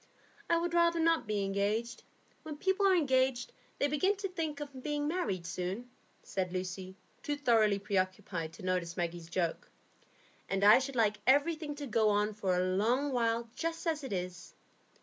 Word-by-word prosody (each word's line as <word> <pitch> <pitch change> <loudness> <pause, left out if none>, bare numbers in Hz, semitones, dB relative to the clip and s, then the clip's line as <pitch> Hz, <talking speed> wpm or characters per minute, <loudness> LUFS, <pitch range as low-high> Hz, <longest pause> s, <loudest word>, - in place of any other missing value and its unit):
"I 335 - +4
would 340 0 -1
rather 340 0 +3
not 330 -6 +2
be 210 -2 0
engaged. 200 +4 -1 0.4
When 305 -2 -7
people 385 +4 +2
are 380 - +5
engaged, 260 -5 +1 0.2
they 285 - +2
begin 335 +8 +1
to 390 0 -4
think 320 -5 -3
of 285 -3 -7
being 295 +1 -2
married 295 - -2
soon," 185 +8 -4 0.3
said 185 -2 -3
Lucy, 185 +1 -5 0.3
too 295 - -2
thoroughly 225 -7 +3
preoccupied 185 -4 -2
to - - -12
notice 180 -1 -1
Maggie's 170 -1 -3
joke; 170 -1 -2 0.8
"and 195 0 0
I 210 +4 +8
should 265 0 -4
like 215 -3 +2
everything 295 +2 +2
to 290 0 -6
go 220 -3 +2
on 210 +1 +1
for 195 -3 0
a 180 - +2
long 230 +10 +1
while 235 -1 0
just 330 +1 -3
as 315 -3 -1
it 265 - -6
is. 180 -1 -5
235 Hz, 170 wpm, -32 LUFS, 190-295 Hz, 0.8 s, I